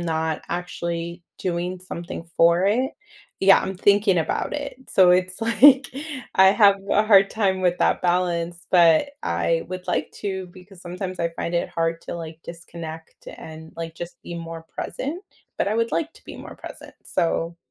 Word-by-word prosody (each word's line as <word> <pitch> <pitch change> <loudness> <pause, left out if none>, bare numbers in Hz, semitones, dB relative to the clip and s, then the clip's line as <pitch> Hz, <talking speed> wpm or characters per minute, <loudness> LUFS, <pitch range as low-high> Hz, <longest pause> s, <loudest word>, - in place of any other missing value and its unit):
not 160 -2 -2
actually 170 0 -4 0.2
doing 180 0 -3
something 170 -2 -7
for 170 +2 +4
it 250 +7 +1 0.5
Yeah, 195 0 +7
I'm 190 - -4
thinking 200 -1 +3
about 160 - -1
it. 285 -3 -5
So, 185 -2 +5
it's 185 +2 +2
like, 260 +5 +6 0.5
I 190 0 +7
have 200 0 +5
a 210 - +4
hard 195 -2 +6
time 195 -4 0
with 180 0 +2
that - - +2
balance, 175 -1 -1
but 170 - +5
I 125 - 0
would 185 0 -6
like - - -1
to 190 -2 -3
because 185 0 -15
sometimes 185 +1 -6
I 170 - 0
find 170 - -3
it 170 - 0
hard 165 0 -1
to, - - -6
like, 160 -1 -7
disconnect 165 -1 -9
and, 160 0 -11
like, 165 -1 -6
just 175 +1 -9
be 175 - -7
more 165 -1 -7
present, 320 +8 -4 0.4
but - - +1
I 215 - 0
would 230 0 0
like 325 0 -1
to - - -19
be - - -9
more - - -10
present. - - -11
So, 170 0 -1
180 Hz, 175 wpm, -23 LUFS, 170-195 Hz, 0.5 s, Yeah